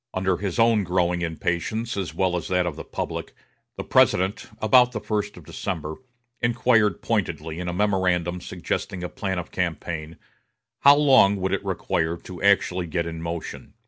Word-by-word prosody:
Under 95 -1 +1
his 95 -1 -3
own 115 -2 +4
growing 90 -1 0
impatience, 85 +7 -2
as 95 -3 -3
well 95 -2 0
as 90 - -3
that 90 -2 +1
of 85 -4 -3
the - - -7
public, - - -5 0.4
the - - -5
President, 95 +3 +2
about 125 +3 +5
the 110 - -2
first 105 -2 -3
of 85 - -13
December, 80 -3 -4 0.4
inquired 120 -2 +2
pointedly, 85 -7 -2
in 90 - -4
a - - -1
memorandum 90 -3 +1
suggesting 90 +1 -4
a 90 - -3
plan 95 -2 -3
of 85 - -5
campaign, 85 -2 -3 0.6
how 140 +1 +8
long 135 -9 +5
it - - -5
would 95 - -1
require 80 +1 -1
to 90 0 -10
actually 95 -3 +2
get 85 +1 -1
in 80 -1 -6
motion. 85 0 -6
90 Hz, 170 wpm, -24 LUFS, 85-105 Hz, 0.6 s, how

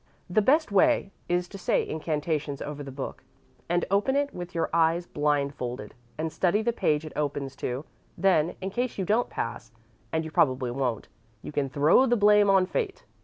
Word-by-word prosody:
The 180 +4 +2
best 295 +4 +3
way 295 -1 +3 0.2
is 175 0 +1
to 195 - -9
say - - +1
incantations 155 -2 -2
over 150 -1 -6
the 140 -1 -7
book, 135 0 -6 0.5
and 175 0 +1
open 205 +7 +2
it 285 0 0
with 175 0 -7
your 165 - +1
eyes 165 +1 +3
blindfolded, 140 -7 -2 0.2
and 160 0 -3
study 200 +4 +1
the 235 +1 +1
page 150 -7 +1
it 155 - -8
opens 145 -2 -2
to; 130 +4 -3 0.3
then, 175 -4 +2
in 190 +1 -3
case 245 +3 -2
you 190 - -1
don't 220 +6 +1
pass, 110 - -5 0.4
and 160 0 -1
you 160 - -7
probably 130 -4 +2
won't, 125 -3 -2 0.4
you - - -6
can 145 -2 -1
throw 150 - +4
the 240 0 +3
blame 210 -1 +5
on 190 -1 +5
fate. 395 - -3
165 Hz, 185 wpm, -27 LUFS, 145-200 Hz, 0.5 s, blame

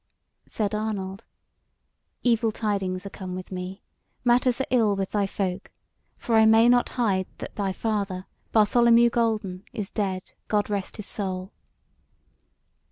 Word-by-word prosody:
Said 210 -1 -2
Arnold: 210 -1 -3 1.0
"Evil 230 -2 +3
tidings 195 -4 -2
are 200 - -6
come 185 -2 -6
with 185 +1 -8
me; 185 +1 -6 0.4
matters 245 0 +3
are 265 - +1
ill 225 -5 +3
with 195 -1 -3
thy 205 -2 +1
folk; 190 -1 -3 0.5
for 235 - -3
I 220 0 +7
may 225 +1 +6
not 245 0 +4
hide 195 -6 +1
that - - -8
thy 200 -2 -1
father, 200 -3 -2 0.3
Bartholomew 235 +2 +5
Golden, 215 -6 0
is 205 -3 -4
dead, 190 -3 -2 0.2
God 210 -1 0
rest 200 -2 -3
his 210 - -6
soul." 190 -1 -4
205 Hz, 140 wpm, -26 LUFS, 190-225 Hz, 1.0 s, I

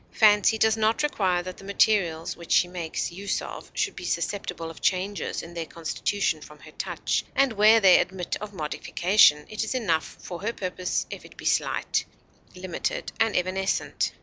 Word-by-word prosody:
Fancy 210 0 +5
does 220 0 +3
not 220 +5 +2
require 185 -11 +1
that 185 0 -7
the - - -13
materials 195 -5 +1
which 170 -1 -11
she 175 - +5
makes 175 -1 -4
use 195 +3 -2
of - - -8
should - - -1
be - - -8
susceptible 180 -5 -3
of 165 - -14
changes 195 +2 -1
in 170 - -10
their 165 -2 -4
constitution 170 +1 -2
from 150 - -13
her - - -14
touch; - - -2
and 270 -3 +3
where 215 +2 +6
they 190 -4 +7
admit 180 -1 -2
of 210 -1 -6
modification, 160 -1 +3
it 215 +1 -3
is 220 - -3
enough 170 -10 -1
for 175 -1 -8
her 225 +3 -2
purpose 185 -2 -2
if - - -7
it - - -15
be - - -10
slight, - - +1 0.5
limited, 180 -1 -3
and 225 -1 +2
evanescent. 185 +2 -1
190 Hz, 175 wpm, -26 LUFS, 170-210 Hz, 0.5 s, they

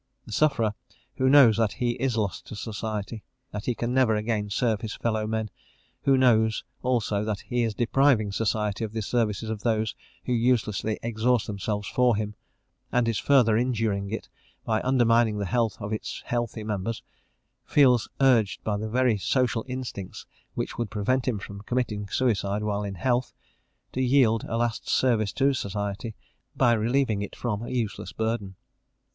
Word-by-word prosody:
The 115 - -11
sufferer 115 -5 +2 0.4
who 130 0 +3
knows 135 -6 +7
that 110 -3 +1
he 120 -1 0
is 120 0 -1
lost 100 -7 -2
to - - -7
society, 105 0 -4 0.3
that 105 0 -5
he 125 - +1
can 120 +2 -2
never 125 -4 +3
again 105 -1 -1
serve 110 0 0
his 110 -2 -4
fellow 110 -2 -1
men; 110 -2 -2 0.5
who 135 -1 +5
knows, 110 -4 +3 0.2
also, 115 -5 0
that 105 -2 -2
he 120 -1 -1
is 115 -3 -1
depriving 120 -3 +3
society 105 0 -1
of 110 -1 -4
the 110 -1 -2
services 110 -1 -1
of 110 -2 -4
those 110 -2 0 0.3
who 125 - 0
uselessly 115 -3 +1
exhaust 115 +1 +1
themselves 105 0 -3
for 125 -2 +3
him, 105 0 -3 0.6
and 125 -1 +2
is 115 -2 0
further 125 -6 +4
injuring 110 -5 0
it 110 - -5 0.4
by 110 -1 +1
undermining 120 -4 +3
the 100 - -2
health 115 0 0
of 105 0 -4
its 110 - -5
healthy 120 -2 -2
members, 105 +1 -3 0.6
feels 125 -5 +4
urged 125 -7 +3
by 105 -1 -1
the 110 +1 -4
very 125 -2 +2
social 125 +1 +1
instincts 125 -7 -6 0.3
which - - -4
would 120 -3 -1
prevent 125 +5 0
him 120 -5 +1
from 100 0 -8
committing 105 -3 -2
suicide 105 -3 0
while 105 -1 -1
in 100 -1 -4
health, 125 +6 0 0.6
to 130 - -1
yield 125 -4 +3
a 115 - -2
last 120 -1 -1
service 110 -6 +2
to 140 0 +2
society 100 0 -4 0.4
by 120 -2 +4
relieving 115 -1 +1
it 100 - -6
from 110 -4 -2
a 120 - -6
useless 120 -5 -3
burden. 110 -4 -2
110 Hz, 170 wpm, -26 LUFS, 105-125 Hz, 0.6 s, knows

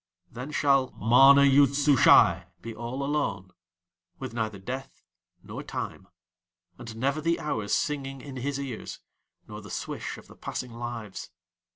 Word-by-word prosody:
Then 125 +4 -7
shall 135 -3 +2
MANA 135 +5 +6
YOOD 140 0 +5
SUSHAI 125 - +5 0.2
be 115 - -6
all 120 +5 -5
alone, 110 -11 -2 0.7
with 130 -3 -7
neither 110 -3 -3
Death 130 +7 -7 0.4
nor - - -7
Time, - - -6 0.7
and 115 -2 -8
never 140 +6 -1
the 170 +2 0
hours 110 -9 -3
singing 135 -2 -1
in 135 0 -9
his 140 +2 -3
ears, 135 -5 -6 0.5
nor - - -8
the - - -12
swish - - -5
of - - -14
the - - -16
passing 125 -2 -6
lives. 115 -4 -6
130 Hz, 145 wpm, -27 LUFS, 115-140 Hz, 0.7 s, MANA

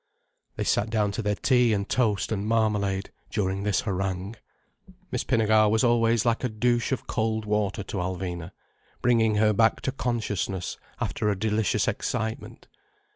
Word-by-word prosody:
They - - -2
sat 105 - +1
down 105 -2 +1
to 100 - -3
their 105 -1 0
tea 125 0 +3
and 100 -1 -1
toast 110 -6 +1
and 105 -1 -2
marmalade, 105 -3 0 0.2
during 95 -2 -1
this 100 -2 +1
harangue. 95 +1 -3 0.8
Miss - - -1
Pinnegar 110 -1 +3
was 110 +1 +2
always 115 -1 +3
like 115 +1 +1
a 125 - +1
douche 120 +3 0
of 130 - -2
cold 110 -1 -1
water 105 -1 -1
to 100 - -6
Alvina, 90 -1 -4 0.5
bringing 115 -3 +3
her 105 0 +3
back 110 +2 +3
to 130 - -1
consciousness 105 -8 -2 0.2
after 105 - -1
a 100 - 0
delicious 110 0 +1
excitement. 110 +1 -3
105 Hz, 155 wpm, -26 LUFS, 100-115 Hz, 0.8 s, tea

